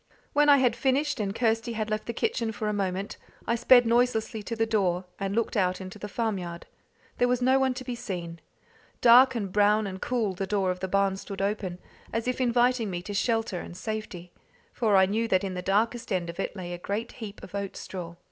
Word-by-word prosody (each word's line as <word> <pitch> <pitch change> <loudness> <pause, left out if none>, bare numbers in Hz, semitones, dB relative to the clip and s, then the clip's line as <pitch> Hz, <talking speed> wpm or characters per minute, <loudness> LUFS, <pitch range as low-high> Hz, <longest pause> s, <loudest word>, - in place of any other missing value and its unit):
When 295 0 +4
I 285 - +8
had 250 -3 +3
finished, 270 +2 +1
and 200 -1 -2
Kirsty 225 0 0
had 215 -1 -3
left 215 0 -2
the - - -1
kitchen 235 - -1
for 215 0 -4
a 210 - 0
moment, 195 0 -2 0.3
I - - +1
sped 245 +1 +6
noiselessly 230 -2 +1
to 230 +3 -5
the 225 0 +1
door, 185 -5 0
and 195 0 -2
looked 230 +1 0
out 185 -3 +1
into 190 +2 -8
the 210 - -5
farmyard. 195 -6 -3 0.5
There 245 - +4
was 250 0 +1
no 260 +2 +4
one 260 -1 +1
to 255 - -6
be 250 -1 -4
seen. 175 -8 -5 0.6
Dark 250 +2 +7
and 200 -5 -3
brown 210 +1 +4
and 190 -1 -6
cool 230 -6 0
the 190 +1 -4
door 195 -2 +1
of 180 - -5
the 190 - -3
barn 195 0 +1
stood 195 0 -7
open, 195 -2 -2 0.3
as 230 +2 -2
if 255 +1 -1
inviting 245 -2 +2
me 175 -1 -4
to 205 - -6
shelter 225 -3 0
and 175 - -9
safety; 195 -5 -5 0.4
for 215 -4 +2
I 190 0 +7
knew 220 +4 0
that 185 -4 +2
in 190 -1 -3
the 180 - -4
darkest 220 +5 0
end 175 -3 -1
of 170 - -16
it 195 - -3
lay 175 -2 -6
a 175 - -6
great 210 +6 -3
heap 215 -4 -9
of - - -11
oat 200 -1 -4
straw. 170 -3 -7
210 Hz, 225 wpm, -27 LUFS, 190-235 Hz, 0.6 s, I